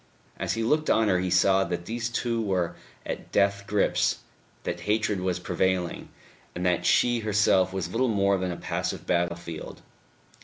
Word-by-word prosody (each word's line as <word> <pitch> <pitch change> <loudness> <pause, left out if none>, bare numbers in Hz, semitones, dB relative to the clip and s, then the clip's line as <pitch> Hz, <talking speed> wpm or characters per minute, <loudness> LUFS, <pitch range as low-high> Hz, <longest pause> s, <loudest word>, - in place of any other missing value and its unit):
As - - -1
he 115 - -2
looked 155 +7 +1
on 110 -1 +3
her 90 -2 +3
he 90 0 -1
saw 95 +2 +4
that 85 -2 -4
these 115 +2 -3
two 115 0 -1
were 95 -5 -1 0.3
at - - -6
death 100 0 +2
grips, 105 -2 +1 0.4
that - - -3
hatred 105 -2 +1
was 90 -1 -1
prevailing, 90 0 -1 0.5
and 90 - -3
that 90 -1 +1
she 120 -1 +3
herself 105 -3 +3
was 95 -1 -3
little 130 +3 +1
more 100 -2 +2
than 90 0 -2
a 85 - -5
passive - - -3
battlefield. 85 -1 -3
95 Hz, 165 wpm, -26 LUFS, 90-110 Hz, 0.5 s, saw